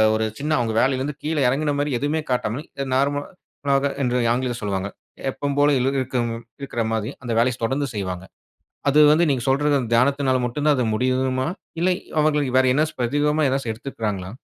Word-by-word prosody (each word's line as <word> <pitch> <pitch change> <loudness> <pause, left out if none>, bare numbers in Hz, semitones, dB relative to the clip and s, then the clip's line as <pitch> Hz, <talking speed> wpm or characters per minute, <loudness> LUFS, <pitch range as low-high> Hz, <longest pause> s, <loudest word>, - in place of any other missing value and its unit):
ஒரு 110 0 0
சின்ன 150 +2 -2
அவுங்க 115 -2 -1
வேலைலிருந்து 135 +2 0
கீழே 155 -1 0
இறங்கின 145 +3 0
மாரி 145 0 0
எதுவுமே 150 +4 0
காட்டாமல், 125 +3 -1 0.2
அ - - -4
நார்மலாக 140 0 -1
என்று 125 -2 +1 0.2
ஆங்கிலத்தில் 125 0 -1
சொல்லுவாங்க. 100 -2 -2 0.4
எப்பவும் 140 +1 -3
போல 145 0 +5
இலுருக்கம் 130 -2 0 0.3
இருக்கிற 135 -4 -3
மாரி, 110 -1 -1
அந்த 120 -2 -5
வேலைய 120 +2 +3
ஸ் - - -22
தொடர்ந்து 135 +5 0
செய்வாங்க. 95 -2 -4 0.6
அது 140 +2 +3
வந்து 165 +3 +4
நீங்க 130 -3 0
சொல்ற 140 +2 +2
அந்த 120 -4 -4
தியானத்தினால 130 +2 +3
மட்டும் 135 +5 -2
தான் 150 -1 +4
அது 125 - +1
முடியுமா? 130 +2 0 0.3
இல்லை, 180 +1 +3 0.3
அவர்கள் 150 -1 +2
வேற 130 0 +5
என்னாச்சும் 155 +3 0
பிரத்யேகமா 145 +5 +1
ஏதாச்சு 135 -3 -1
எடுத்துக்கிறாங்களா? 110 -6 -4
130 Hz, 170 wpm, -22 LUFS, 120-145 Hz, 0.6 s, போல